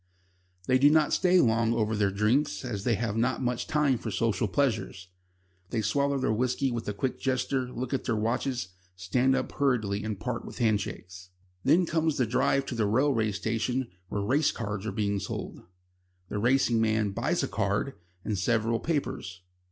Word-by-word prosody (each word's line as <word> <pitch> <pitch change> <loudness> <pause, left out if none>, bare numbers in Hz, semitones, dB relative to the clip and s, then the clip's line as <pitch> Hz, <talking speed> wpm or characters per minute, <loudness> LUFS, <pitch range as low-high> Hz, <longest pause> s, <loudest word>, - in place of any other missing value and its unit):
They 130 +4 +3
do 145 +2 +7
not 155 -1 +3
stay 185 0 +4
long 115 -3 +3
over 110 -1 0
their 105 -2 +2
drinks, 115 +9 +1
as 105 -5 -4
they 120 - +3
have 115 -1 -2
not 120 +2 +1
much 125 -2 -2
time 150 -5 +2
for - - -5
social 115 0 0
pleasures. 110 -5 -1 0.6
They 110 - -1
swallow 140 +5 +1
their 130 -4 +1
whisky 125 +3 0
with 120 -1 -4
a - - -2
quick 130 +5 -2
gesture 130 -1 -1
look 125 +2 -4
at 135 - -1
their 115 - 0
watches, 120 0 -1 0.3
stand 125 +9 +1
up 130 - -2
hurriedly 110 -8 0
and 105 -2 -4
part 125 -2 -3
with - - -9
handshakes. 95 -5 -2 0.3
Then 165 +7 +4
comes 160 -2 0
a 125 - +3
drive 130 +4 +1
to 135 - -5
the 115 -3 0
railway 115 -1 +2
station 115 +5 -2 0.2
where 105 - -2
race 140 +8 +2
cards 105 -2 -4
are - - -1
being 100 0 -1
sold. - - -6 0.7
The 105 - -2
racing 120 0 +3
man 110 -2 +1
buys - - 0
a - - 0
"card" - - -1 0.3
and 105 -3 -1
several 115 +2 +1
papers. 100 - -3
115 Hz, 180 wpm, -28 LUFS, 105-130 Hz, 0.7 s, do